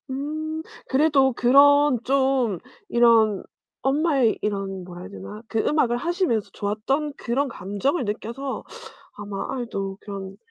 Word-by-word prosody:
음. 310 Hz, +4 st, -3 dB, 0.3 s
그래도 275 Hz, -1 st, +4 dB
그런 280 Hz, +2 st, +5 dB
좀 265 Hz, -6 st, +2 dB, 0.3 s
이런 225 Hz, -4 st, +4 dB, 0.4 s
엄마의 275 Hz, -3 st, +2 dB
이런 195 Hz, -2 st, -3 dB
뭐라 175 Hz, 0 st, -9 dB
해야 -, -, -8 dB
되나 95 Hz, -, -9 dB
그 225 Hz, -, -2 dB
음악을 250 Hz, -5 st, +2 dB
하시면서 335 Hz, -, 0 dB
좋았던 270 Hz, +9 st, -2 dB
그런 270 Hz, +4 st, -1 dB
감정을 235 Hz, -, -2 dB
느껴서 235 Hz, +6 st, -4 dB, 0.5 s
아마 205 Hz, -1 st, -5 dB
'아이도 200 Hz, -6 st, -4 dB
그런 195 Hz, -2 st, -7 dB
245 Hz, 265 characters per minute, -24 LUFS, 205-280 Hz, 0.5 s, 그런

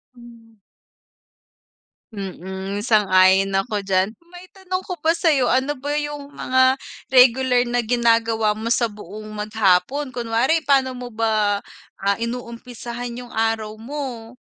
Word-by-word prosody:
Hmm. 230 Hz, -2 st, -16 dB, 1.6 s
Mm, 190 Hz, +1 st, -5 dB
sang-ayon 195 Hz, -3 st, +4 dB
ako 205 Hz, 0 st, -1 dB
diyan. 195 Hz, +2 st, 0 dB
Ma-itanong 370 Hz, +2 st, -7 dB
ko 365 Hz, -, -4 dB
pa 330 Hz, +1 st, +2 dB
sa'yo, 290 Hz, -8 st, +2 dB
ano 265 Hz, +3 st, +1 dB
ba 285 Hz, +1 st, -7 dB
yung 295 Hz, -1 st, -4 dB
mga 260 Hz, +1 st, +3 dB, 0.3 s
regular 250 Hz, -1 st, +5 dB
na 240 Hz, 0 st, 0 dB
ginagawa 230 Hz, -2 st, +2 dB
mo 220 Hz, +2 st, -5 dB
sa 235 Hz, 0 st, +2 dB
buong 210 Hz, 0 st, -9 dB
mag-hapon, 215 Hz, +6 st, +1 dB
kunwari 240 Hz, +7 st, +1 dB
paano 270 Hz, -3 st, +2 dB
mo 245 Hz, -1 st, -7 dB
ba, 215 Hz, -2 st, +1 dB, 0.4 s
ah, 200 Hz, 0 st, 0 dB
inuumpisahan 240 Hz, 0 st, -6 dB
yung 240 Hz, -, -15 dB
araw 225 Hz, -1 st, -1 dB
mo? 250 Hz, -3 st, -6 dB
235 Hz, 120 wpm, -21 LUFS, 215-260 Hz, 1.6 s, regular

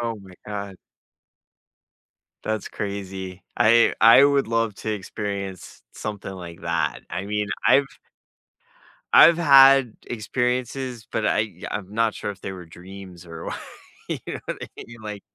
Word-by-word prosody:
Oh 115 Hz, -1 st, -2 dB
my 95 Hz, -2 st, -14 dB
god. 100 Hz, -2 st, -6 dB, 1.7 s
That's 110 Hz, -2 st, -3 dB
crazy. 95 Hz, -2 st, -6 dB
I 115 Hz, +2 st, +5 dB
I 115 Hz, +4 st, +8 dB
would 140 Hz, -2 st, +3 dB
love 115 Hz, -2 st, 0 dB
to 110 Hz, -, -3 dB
experience 100 Hz, -2 st, -6 dB
something 105 Hz, -2 st, -6 dB
like 85 Hz, -3 st, -9 dB
that. 85 Hz, -2 st, -1 dB
I 95 Hz, -, -4 dB
mean, 105 Hz, +1 st, -2 dB, 0.2 s
I've 140 Hz, 0 st, +5 dB, 1.3 s
I've 165 Hz, +1 st, +8 dB
had 135 Hz, -6 st, +7 dB
experiences, 125 Hz, +1 st, -2 dB
but 110 Hz, -, -2 dB
I 105 Hz, -1 st, +1 dB, 0.2 s
I'm 100 Hz, -1 st, -5 dB
not 115 Hz, -1 st, +1 dB
sure -, -, -4 dB
if 95 Hz, -, -18 dB
they -, -, -5 dB
were 90 Hz, -2 st, -10 dB
dreams 90 Hz, +1 st, -12 dB
or 80 Hz, -1 st, -9 dB
wha -, -, -3 dB, 0.6 s
You -, -, -2 dB
know -, -, -4 dB
what -, -, -4 dB
I -, -, -6 dB, 0.2 s
mean? 115 Hz, 0 st, -12 dB
Like 105 Hz, -1 st, -6 dB
105 Hz, 145 wpm, -23 LUFS, 95-115 Hz, 1.7 s, I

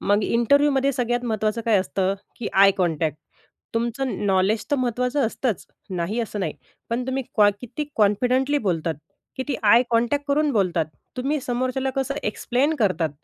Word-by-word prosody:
मग 205 Hz, +1 st, +2 dB
इंटरव्ह्यूमध्ये 275 Hz, +3 st, +3 dB
सगळ्यात 245 Hz, -1 st, -1 dB
महत्त्वाचं 220 Hz, -1 st, -1 dB
काय 220 Hz, -3 st, +4 dB
असतं, 185 Hz, +2 st, 0 dB, 0.2 s
की 235 Hz, -, -4 dB
आय 195 Hz, +1 st, +7 dB
कॉन्टॅक्ट. 160 Hz, -4 st, 0 dB, 0.6 s
तुमचं 240 Hz, +3 st, -1 dB
नॉलेज 195 Hz, +3 st, +2 dB
तर 290 Hz, -, +3 dB
महत्वाचं 250 Hz, +1 st, 0 dB
असतंच, 230 Hz, -2 st, -2 dB, 0.2 s
नाही 185 Hz, +5 st, -2 dB
असं 215 Hz, -2 st, -4 dB
नाही, 170 Hz, -5 st, -2 dB, 0.4 s
पण 245 Hz, +2 st, -1 dB
तुम्ही 265 Hz, +1 st, -1 dB
क्वा 205 Hz, -1 st, +6 dB
किती 250 Hz, +5 st, -5 dB
कॉन्फिडेंटली 250 Hz, +7 st, +2 dB
बोलतात, 170 Hz, -, -1 dB, 0.4 s
किती 265 Hz, +1 st, -2 dB
आय 225 Hz, +3 st, +6 dB
कॉन्टॅक्ट. 240 Hz, +5 st, +1 dB
करून 295 Hz, +1 st, +2 dB
बोलतात, 180 Hz, -7 st, +1 dB, 0.3 s
तुम्ही 275 Hz, +4 st, -1 dB
समोरच्याला 255 Hz, +2 st, -1 dB
कसं 270 Hz, 0 st, -1 dB
एक्सप्लेन 250 Hz, +8 st, 0 dB
करतात 185 Hz, -, +1 dB
235 Hz, 150 wpm, -23 LUFS, 200-265 Hz, 0.6 s, आय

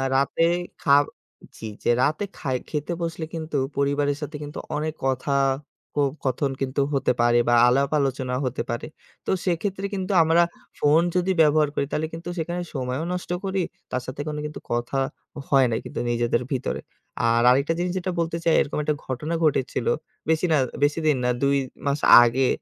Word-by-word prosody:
রাতে 140 Hz, +4 st, +2 dB, 0.4 s
খা 140 Hz, -, +6 dB, 0.6 s
...চ্ছি 110 Hz, -, -7 dB, 0.2 s
যে -, -, +3 dB
রাতে 155 Hz, +8 st, +1 dB
খাই 130 Hz, -2 st, -1 dB
খেতে 150 Hz, +3 st, -2 dB
বসলে 165 Hz, -1 st, -3 dB
কিন্তু, 160 Hz, -2 st, -3 dB, 0.2 s
পরিবারের 140 Hz, 0 st, +1 dB
সাথে 150 Hz, +1 st, -5 dB
কিন্তু, 145 Hz, 0 st, -7 dB, 0.2 s
অনেক 155 Hz, +1 st, -2 dB
কথা 135 Hz, +1 st, 0 dB, 0.6 s
ক -, -, -12 dB, 0.3 s
কথন 135 Hz, +2 st, 0 dB
কিন্তু 135 Hz, +1 st, 0 dB
হতে 135 Hz, -, +2 dB
পারে 120 Hz, 0 st, +4 dB
বা, 120 Hz, -, +4 dB
আলাপ 135 Hz, +3 st, +3 dB
আলোচনা 130 Hz, -2 st, -1 dB
হতে 130 Hz, 0 st, -2 dB
পারে। 120 Hz, -, -3 dB, 0.4 s
তো -, -, 0 dB
সেক্ষেত্রে 190 Hz, +3 st, -1 dB
কিন্তু 190 Hz, -1 st, -2 dB
আমরা 165 Hz, +2 st, +4 dB, 0.4 s
phone 155 Hz, +3 st, +4 dB
যদি 180 Hz, +1 st, +2 dB
ব্যবহার 150 Hz, -1 st, +4 dB
করি -, -, +1 dB
তাহলে 155 Hz, +1 st, -1 dB
কিন্তু 165 Hz, +1 st, -6 dB
সেখানে 175 Hz, +2 st, -2 dB
সময়ও 130 Hz, +2 st, -2 dB
নষ্ট 180 Hz, -1 st, -5 dB
করি। 190 Hz, 0 st, -1 dB, 0.3 s
তার 130 Hz, -, -1 dB
সাথে 130 Hz, +2 st, -5 dB
কোনো 150 Hz, -1 st, -3 dB
কিন্তু 150 Hz, -, -6 dB
কথা 120 Hz, +3 st, -1 dB, 0.5 s
হয় 135 Hz, -2 st, +5 dB
নাই 110 Hz, -, 0 dB
কিন্তু -, -, -5 dB
নিজেদের 120 Hz, 0 st, +1 dB
ভিতরে। 130 Hz, -2 st, -2 dB, 0.5 s
আর 115 Hz, 0 st, +3 dB
আরেকটা 140 Hz, +6 st, +3 dB
জিনিস 180 Hz, 0 st, 0 dB
যেটা 185 Hz, +1 st, -3 dB
বলতে 165 Hz, 0 st, -1 dB
চাই 165 Hz, -, +3 dB
এরকম -, -, -3 dB
একটা 150 Hz, 0 st, 0 dB
ঘটনা 135 Hz, +6 st, -3 dB
ঘটেছিল। 145 Hz, -, +1 dB, 0.4 s
বেশি 160 Hz, +2 st, +2 dB
না, 155 Hz, -, +5 dB, 0.3 s
বেশিদিন 150 Hz, +1 st, +2 dB
না, 125 Hz, -, +2 dB
২ 140 Hz, 0 st, +3 dB, 0.3 s
মাস 140 Hz, +1 st, +1 dB, 0.2 s
আগে 125 Hz, +2 st, +2 dB
145 Hz, 170 wpm, -24 LUFS, 130-165 Hz, 0.6 s, খা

